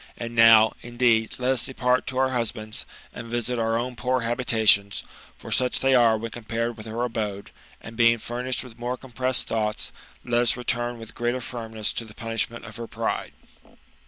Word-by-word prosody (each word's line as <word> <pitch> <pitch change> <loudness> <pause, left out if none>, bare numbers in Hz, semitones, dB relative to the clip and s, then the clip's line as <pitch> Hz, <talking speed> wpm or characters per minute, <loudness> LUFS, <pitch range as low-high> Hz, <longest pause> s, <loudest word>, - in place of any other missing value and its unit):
And 115 0 -5
now, 115 -1 +7
indeed, 120 -2 +1
let 125 +1 +1
us 130 -3 +1
depart 125 -1 +1
to 130 - -3
our 130 0 +3
husbands, 115 -3 -3 0.3
and 115 - -8
visit 120 +1 -2
our 115 0 +1
own 125 +1 -3
poor 125 +3 0
habitations, 115 -4 +3 0.3
for - - -10
su«:h 125 -1 +2
they 135 0 +3
are 115 -3 +5
when 115 +1 -5
compared 115 0 -3
with 110 0 -10
her 115 +2 -2
abode, 105 -4 -3 0.3
and 115 - -10
beinc; 115 -1 +4
furnished 125 +2 -3
with 120 -2 -13
more 125 +1 -2
compressed 130 0 -1
thoughts, 105 -1 -1 0.3
let 120 0 +2
us 120 0 +2
return 120 0 -2
with 115 -1 -11
greater 120 +2 -1
firmness 110 -3 -4
to 115 - -4
the 105 -2 -14
punishment 115 0 -3
of - - -10
her 115 -1 -6
pride." - - -3
120 Hz, 185 wpm, -25 LUFS, 115-125 Hz, 0.3 s, now